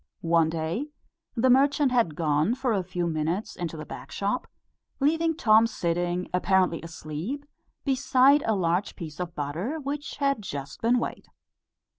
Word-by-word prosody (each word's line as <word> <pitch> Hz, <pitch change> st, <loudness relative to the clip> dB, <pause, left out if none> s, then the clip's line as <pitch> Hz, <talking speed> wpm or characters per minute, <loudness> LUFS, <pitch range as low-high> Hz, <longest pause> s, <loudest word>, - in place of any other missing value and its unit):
One 165 Hz, -1 st, +4 dB
day, 165 Hz, -, -2 dB, 0.5 s
the 255 Hz, +2 st, +4 dB
merchant 275 Hz, +1 st, +4 dB
had 230 Hz, -11 st, +2 dB
gone 155 Hz, +7 st, +1 dB
for 255 Hz, -3 st, 0 dB
a 195 Hz, -, +1 dB
few 180 Hz, -1 st, -3 dB
minutes 165 Hz, +5 st, -2 dB
into 165 Hz, -3 st, -4 dB
the 155 Hz, -, -6 dB
back 125 Hz, -, -9 dB
shop, 205 Hz, +5 st, -2 dB, 0.5 s
leaving 325 Hz, +3 st, +2 dB
Tom 220 Hz, -6 st, +5 dB
sitting, 175 Hz, -3 st, -1 dB
apparently 185 Hz, -2 st, +2 dB
asleep, 165 Hz, -, -6 dB, 0.4 s
beside 270 Hz, +1 st, +4 dB
a 220 Hz, -, +3 dB
large 180 Hz, +1 st, 0 dB
piece 160 Hz, -4 st, -8 dB
of 175 Hz, -1 st, -4 dB
butter, 170 Hz, -, -3 dB
which 290 Hz, +1 st, -4 dB
had 275 Hz, -5 st, 0 dB
just 140 Hz, -7 st, -6 dB
been 235 Hz, +2 st, +3 dB
weighed. -, -, -4 dB
190 Hz, 150 wpm, -27 LUFS, 165-260 Hz, 0.5 s, Tom